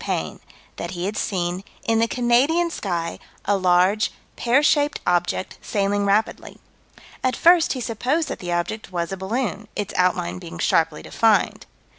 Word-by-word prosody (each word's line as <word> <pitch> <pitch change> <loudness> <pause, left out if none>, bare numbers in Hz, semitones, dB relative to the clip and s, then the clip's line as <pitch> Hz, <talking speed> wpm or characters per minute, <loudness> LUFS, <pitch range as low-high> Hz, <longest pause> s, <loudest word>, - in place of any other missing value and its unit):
Payne: - - -3 0.4
that - - -4
he 175 - -2
had 205 +2 -2
seen, 180 -2 -2 0.2
in 225 0 +2
the 230 - +3
Canadian 260 +9 +2
sky, 170 - -3 0.3
a 205 - +2
large, 185 +3 +3 0.2
pear 245 +5 +2
shaped 295 -1 +2
object, 175 +1 0
sailing 200 -1 0
rapidly. 205 +3 0 0.7
At 255 -1 +1
first 340 +2 +5
he 255 - -5
supposed 255 +8 -1
that - - -5
the 175 -1 -5
object 175 +4 -3
was 170 -1 -2
a 195 - -3
balloon, 215 +2 -3
"its 205 -1 -3
outline 90 - +1
being 85 - -9
sharply - - +1
defined." - - +1
205 Hz, 155 wpm, -22 LUFS, 180-245 Hz, 0.7 s, first